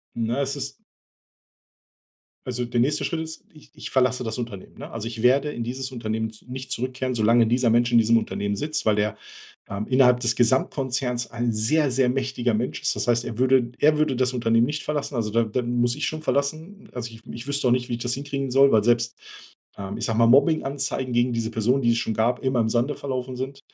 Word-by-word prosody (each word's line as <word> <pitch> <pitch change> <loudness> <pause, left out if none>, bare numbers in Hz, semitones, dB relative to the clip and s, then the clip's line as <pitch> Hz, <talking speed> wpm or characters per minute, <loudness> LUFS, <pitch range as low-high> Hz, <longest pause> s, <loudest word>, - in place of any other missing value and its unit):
Ne, 115 +4 -1
es 140 0 -2
ist - - -6 1.7
Also, 125 -1 -3
der 120 0 -1
nächste 145 +5 +1
Schritt 165 - -2
ist. 160 0 -6
Ich 155 - -17
ich - - -8
verlasse 125 -1 +1
das 110 0 -4
Unternehmen, 115 -6 -7
ne? - - -8
Also, 115 -1 -5
ich 115 -1 -6
werde 135 +4 +3
in 120 - -4
dieses 130 +3 -5
Unternehmen 110 -2 -3
n 110 - -15
nicht 130 +1 -7
zurückkehren, 130 0 -2
solange 115 0 +4
dieser 120 0 +2
Mensch 120 +1 +3
in 120 - +5
diesem 115 +1 +5
Unternehmen 100 -2 -2
sitzt, 150 +3 -3
weil 105 -1 +4
der, 105 0 -1 0.5
ähm, 100 +2 -4
innerhalb 125 -1 +4
des 120 -2 +1
Gesamtkonzerns 125 0 0
ein 120 0 -1
sehr, 135 +7 +2
sehr 130 -1 +2
mächtiger 125 -3 -1
Mensch 115 +4 -2
ist. - - 0
Das - - -2
heißt, 120 0 +2
er 115 - -6
würde 130 -2 +3
er 150 0 +4
würde 145 -4 +1
das 130 0 +1
Unternehmen 115 -1 +2
nicht 150 +1 -3
verlassen, 150 -2 -3
also, 110 -3 -1
da 115 +2 +2
da 115 +3 -2
muss 120 0 0
ich 145 +2 -2
schon 155 0 -4
verlassen. 155 +8 -2
Also, 120 -2 -5
ich 110 - -13
ich 115 +3 -8
wüsste 140 -2 0
auch - - +4
nicht, 125 -1 0
wie 120 - -2
ich 120 - -5
das 120 0 -1
hinkriegen 140 -1 -4
soll, 135 +2 +5
weil 110 - +5
selbst, 120 +1 +2 0.6
ähm, 100 0 -5
ich - - -4
sage 115 0 -1
mal, 115 - +6
Mobbinganzeigen 135 -1 +2
gegen 120 +1 +2
diese 115 -1 -2
Personen, 120 +5 +1
die 120 -1 +3
es 115 - 0
schon 110 - -2
gab, 120 +3 +1
immer 130 -2 0
im 110 - +1
Sande 120 +5 0
verlaufen 130 -2 -4
sind. 135 +2 -5
125 Hz, 225 wpm, -24 LUFS, 115-135 Hz, 1.7 s, mal